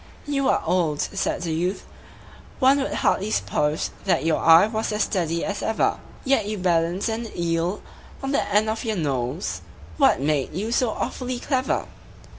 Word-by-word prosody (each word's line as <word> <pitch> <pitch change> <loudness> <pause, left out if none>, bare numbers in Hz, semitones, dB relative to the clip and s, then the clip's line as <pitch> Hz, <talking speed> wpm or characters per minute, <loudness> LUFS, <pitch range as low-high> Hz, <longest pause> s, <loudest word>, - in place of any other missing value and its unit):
"You 275 -2 0
are - - +2
old," 165 -4 +1
said 175 - -2
the 165 -2 -2
youth, 180 +4 -2 0.7
"one 270 +1 +4
would 270 - -2
hardly 200 +2 +1
suppose 150 -6 0
That 175 -5 +1
your 165 -1 +2
eye 165 +4 +7
was 220 0 -2
as 210 0 +1
steady 170 -4 -1
as 200 0 -3
ever; 220 - 0 0.3
Yet 260 -6 +2
you 210 0 -3
balanced 175 +1 +1
an 225 0 -3
eel 170 +3 -1 0.4
on 270 - -2
the 280 - +2
end 210 +1 +3
of 220 +1 -2
your 220 -2 -1
nose 130 - -2 0.4
What - - +4
made 145 0 0
you 210 +5 -2
so 245 0 +2
awfully 250 +3 -3
clever?" 260 0 -1
190 Hz, 170 wpm, -24 LUFS, 165-225 Hz, 0.7 s, eye